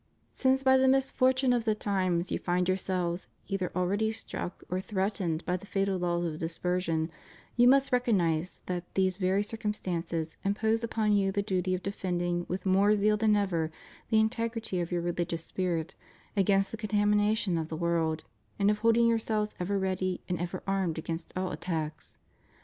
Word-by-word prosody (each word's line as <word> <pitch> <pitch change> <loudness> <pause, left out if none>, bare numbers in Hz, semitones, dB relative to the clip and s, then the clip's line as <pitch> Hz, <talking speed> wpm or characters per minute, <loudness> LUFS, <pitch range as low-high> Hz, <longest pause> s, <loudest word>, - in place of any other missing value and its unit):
Since 265 0 +2
by 265 0 +6
the 260 0 +4
misfortune 260 -1 +3
of 240 -2 +1
the 220 -1 +1
times, 185 -4 0
you - - 0
find 180 0 0
yourselves 185 -1 -1 0.2
either 195 -2 -2
already 200 +5 +1
struck 220 -5 -6
or 185 +1 -2
threatened 190 -4 -1
by 180 0 0
the 200 - -13
fatal 195 -1 0
laws 175 -1 0
of 160 -2 -3
dispersion 165 -1 -1 0.4
you 240 +1 +6
must 275 +1 +5
recognize 185 - +1
that 175 -1 -4
these 185 -1 +2
very 190 +1 +2
circumstances 180 -7 -3
impose 220 +3 +1
upon 220 -2 0
you 195 -1 +3
the 200 +1 0
duty 185 -2 0
of 185 - -6
defending 175 -3 -2
with 185 +1 -3
more 195 +2 +4
zeal 210 +1 +3
than 215 0 +3
ever 170 -6 0 0.4
the 220 - +3
integrity 225 -3 -1
of 175 0 -3
your 175 -1 0
religious 170 -1 -2
spirit 170 -4 -2 0.4
against 195 0 +3
the 225 - -5
contamination 210 -2 +2
of 160 -1 -2
the 160 - -4
world 165 -2 0 0.3
and 200 +1 +3
of 210 - -1
holding 230 +1 +4
yourselves 220 -2 +1
ever 195 +3 0
ready 185 -1 -1
and 180 -2 -2
ever 175 +1 -4
armed 190 -4 0
against 165 0 -4
all 185 0 -1
attacks. 155 -4 -4
190 Hz, 170 wpm, -29 LUFS, 175-215 Hz, 0.4 s, by